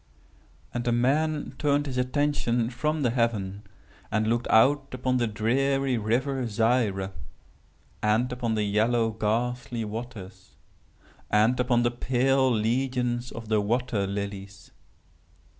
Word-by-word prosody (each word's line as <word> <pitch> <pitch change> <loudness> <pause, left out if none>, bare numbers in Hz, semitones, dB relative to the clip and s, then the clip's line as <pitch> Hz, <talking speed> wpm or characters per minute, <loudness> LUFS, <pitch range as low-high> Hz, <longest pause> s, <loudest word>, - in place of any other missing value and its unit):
"And 120 - -2
the 120 - 0
man 145 +6 +1
turned 145 -1 +2
his 130 -3 -3
attention 125 -3 0
from 150 +4 -1
the 120 - +2
heaven, 105 -5 -1 0.5
and 110 +1 0
looked 115 +2 0
out 140 +5 +4
upon 130 0 0
the 120 -1 +1
dreary 130 +5 +1
river 125 +4 0
Zaire, 110 -3 +1 0.9
and 110 +4 +1
upon 120 -3 -1
the 105 - 0
yellow 115 +3 +2
ghastly 115 +2 -2
waters, 110 -3 -8 0.7
and 110 +4 +3
upon 125 -1 +2
the 120 - +2
pale 130 +2 +2
legions 120 +2 0
of 115 -1 -8
the 105 -1 +2
water 110 -2 0
lilies. 100 0 -6
120 Hz, 125 wpm, -26 LUFS, 110-130 Hz, 0.9 s, out